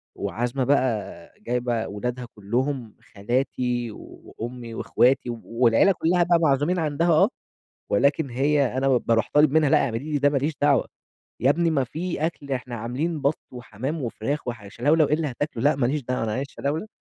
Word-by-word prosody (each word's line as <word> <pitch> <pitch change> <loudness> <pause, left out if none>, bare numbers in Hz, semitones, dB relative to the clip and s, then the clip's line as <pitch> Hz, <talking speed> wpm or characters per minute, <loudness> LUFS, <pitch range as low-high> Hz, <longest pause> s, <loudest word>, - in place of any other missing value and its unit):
وعازمة 120 +3 -2
بقى 130 -5 -1
جايبة 120 -1 -1
ولادها 125 +4 -4
كلهم، 120 +3 -2 0.2
خالاتي 120 +2 -1
وأمي 120 +2 -9
واخواتي 125 +3 +2
والعيلة 115 - +3
كلّها 175 0 +2
بقى 170 0 +3
معزومين 155 +3 +2
عندها 160 +2 0
آه، 155 - +5 0.6
ولكن 140 +6 +2
هي 135 0 +1
أنا 135 +1 +1
باروح 115 -2 +1
طالب 150 -1 +5
منها 155 -2 +3
لأ - - +4
اعملي 135 +4 -4
لي 145 - +2
ده 145 +1 +4
ماليش 145 +2 0
دعوة، 145 -3 +3 0.5
يا 130 - +3
ابني 165 +3 +2
ما 140 -4 +2
في 160 +5 -3
أكل 145 -4 -5
إحنا 125 -2 -3
عاملين 135 +8 -3
بط 140 +3 +1
وحمام 125 +5 -5
وفراخ، 125 +4 -3
وح 115 -4 -5
شلَولَو 145 +9 +2
إيه - - 0
اللي 155 0 0
هتاكله؟ 130 -2 -4
لأ 145 0 +4
ما 135 -3 0
ليش 145 +3 -1
دعوة 125 -1 -2
أنا 110 - -2
عايز 135 +4 -3
شلَولَو، 150 +11 -3
135 Hz, 170 wpm, -24 LUFS, 120-150 Hz, 0.6 s, آه